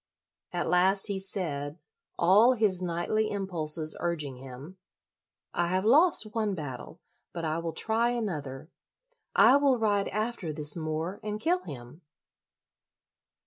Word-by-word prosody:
At 175 -1 -2
last 190 +3 +4
he 200 -1 -2
said, 155 -6 -3 0.4
all 205 +8 +5
his 210 -6 +1
knightly 180 +5 -1
impulses 165 -6 0
urging 150 -6 -3
him, 135 +7 -11 0.4
" - - -64 0.3
I 175 - 0
have 185 +3 -1
lost 265 -4 +4
one 215 -3 -1
battle, 145 0 -8 0.3
but 170 -1 -4
I 155 +1 -1
will 165 -1 -4
try 225 +7 +1
another. 155 - -4 0.6
I 275 - +7
will 280 -3 +3
ride 205 -3 +1
after 215 -5 -3
this 150 -1 -2
Moor 160 +3 -4
and 210 0 -4
kill 350 +8 +1
him." 125 +5 -10
180 Hz, 135 wpm, -28 LUFS, 155-215 Hz, 0.6 s, I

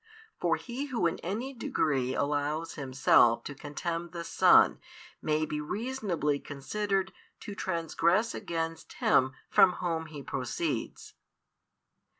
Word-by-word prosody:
For - - +2
he 255 +3 -5
who 235 -10 -1
in 170 - 0
any 230 +10 -4
degree 135 - 0
allows 145 +3 -1
himself 130 -4 +3
to 145 - -6
contemn 165 +4 -4
the 170 0 -6
Son - - +5 0.4
may 155 0 +1
be 150 0 -3
reasonably 195 - -2
considered 190 +8 -2 0.3
to 205 - -7
transgress 170 +4 0
against 165 -1 -4
Him 130 0 +3
from 180 - +6
Whom 165 -3 -2
He 150 -3 -9
proceeds. - - -3
165 Hz, 120 wpm, -30 LUFS, 145-190 Hz, 0.4 s, from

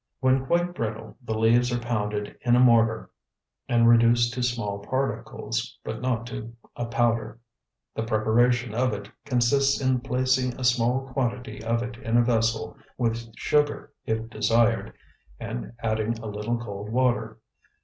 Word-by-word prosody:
When 130 0 +2
quite 175 +2 +1
brittle 110 -8 -5
the 110 -3 -3
leaves 120 +2 +3
are 120 - +1
pounded 105 -3 -3
in 120 0 +3
a - - +4
mortar 115 -3 +4 0.6
and 115 -1 +4
reduced 120 0 +5
to 125 - -3
small 115 -5 -1
particles, 115 0 -3
but - - -5
not 125 -3 -1
to 115 -1 -7 0.2
a 120 - -3
powder. 115 -1 0 0.5
The - - -3
preparation 115 +1 +2
of 125 +1 +1
it 100 +1 -7
consists 140 +1 +2
in 130 -2 +1
placing 130 -1 0
a - - -4
small 120 +1 +2
quantity 125 -3 -3
of 115 +1 0
it 120 -1 -6
in 120 -2 0
a 120 - +5
vessel, 115 -1 0 0.2
with 115 -1 -2
sugar 150 -1 0
if 110 0 -2
desired, 115 0 +1 0.5
and - - -5
adding 110 0 0
a 115 - -9
little 105 +3 -2
cold 105 -3 -7
water. 125 +1 0
120 Hz, 150 wpm, -26 LUFS, 110-125 Hz, 0.6 s, reduced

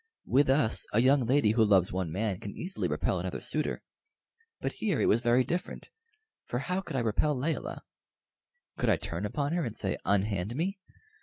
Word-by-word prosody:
With 135 +2 +3
us 135 -4 +3
a 110 - +4
young 130 0 +4
lady 130 -4 +4
who 110 0 +3
loves 95 -4 +4
one 90 -3 -2
man 100 +1 -1
can 100 - -7
easily 190 +2 -3
repel - - -1
another - - -4
suitor; - - -2 0.8
but - - -2
here 195 -10 -1
it - - +2
was 115 - +3
very 120 +1 +3
different, 175 +7 -4 0.6
for 120 - -2
how 180 +9 -1
could 170 - -7
I 130 - +1
repel 125 +6 +1
Layelah? 155 +5 -3 1.0
Could - - +1
I - - +4
turn - - -4
upon 145 0 -2
her 175 -1 0
and 115 -5 -5
say 95 - -1
"Unhand 100 +1 0
me"? 190 +6 -2
125 Hz, 185 wpm, -29 LUFS, 105-150 Hz, 1.0 s, a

